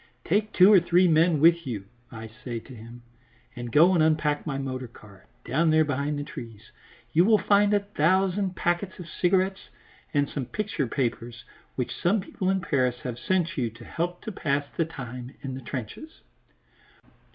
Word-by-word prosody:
"Take 210 +4 +1
two 190 +3 +6
or 195 - +8
three 175 +2 +3
men 160 -1 +3
with 165 0 +4
you," 105 -6 -4 0.3
I 110 -1 -8 0.2
say 120 -2 -4
to 130 - -14
him, 120 +1 -12 0.5
"and 120 -1 -6
go 170 +8 +6
and 170 - +3
unpack 155 -1 +1
my 135 -2 -2
motor 130 -2 -4
car, 105 -4 -17 0.2
down 155 +7 +1
there 155 0 +4
behind 145 +1 -2
the 145 - -3
trees. 115 -6 -10 0.4
You 170 - +5
will 215 +2 +5
find 205 0 +3
a 205 -1 +3
thousand 190 +1 +1
packets 175 +2 -1
of 180 - -9
cigarettes 185 +2 0 0.4
and 145 0 +1
some 135 -4 -5
picture 210 - -2
papers 120 -2 -3 0.3
which 125 - -3
some 200 +5 +1
people 185 0 -3
in 190 0 +1
Paris 130 -6 0
have 120 -1 -5
sent 175 -5 0
you 120 -3 0
to 115 +1 -14
help 175 +1 -4
to 220 - -5
pass 145 -6 -1
the 165 - +1
time 125 -4 -8
in 135 -2 -4
the 130 - -6
trenches." 130 - -7
155 Hz, 180 wpm, -26 LUFS, 125-180 Hz, 0.5 s, or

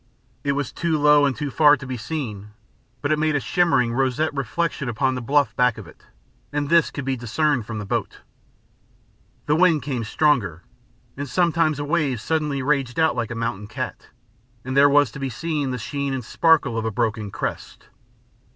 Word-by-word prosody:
It 140 - +1
was 140 -2 -2
too 165 -2 0
low 150 -1 +5
and 135 - -1
too 145 -2 -4
far 150 +1 +5
to 135 - -9
be 130 -1 -4
seen, 110 -5 -5 0.5
but 145 - 0
it 155 - +2
made 155 -1 +1
a - - +2
shimmering, 135 -7 +1
roseate 135 +4 0
reflection 140 +1 -2
upon 130 +3 0
the 125 - -4
bluff 140 +3 +1
back 125 -3 +2
of 110 - -9
it, 80 - -18 0.4
and 145 -1 -2
this 170 -1 +4
could 140 - -6
be 135 -1 0
discerned 120 +1 0
from 110 - -5
the 105 - -5
boat. - - -3 1.2
The 150 - +2
wind 165 -3 +3
came 130 -5 -3
stronger, 110 - +1 0.5
and 140 0 -5
sometimes 165 0 +2
a 145 - -3
wave 145 -6 0
suddenly 150 +1 -1
raged 135 -2 0
out 160 -2 +3
like 120 -3 -2
a 120 - -5
mountain 115 -3 -3
cat, 110 - -6 0.6
and 130 +1 -3
there 140 +1 +6
was 145 -4 +4
to 135 - -9
be 135 -1 -2
seen 150 +2 -2
the 125 - -3
sheen 140 +4 -3
and 125 -3 -5
sparkle 150 -8 +2
of 110 - -4
a - - +1
broken 110 -1 -2
crest. - - -6
140 Hz, 195 wpm, -23 LUFS, 120-150 Hz, 1.2 s, there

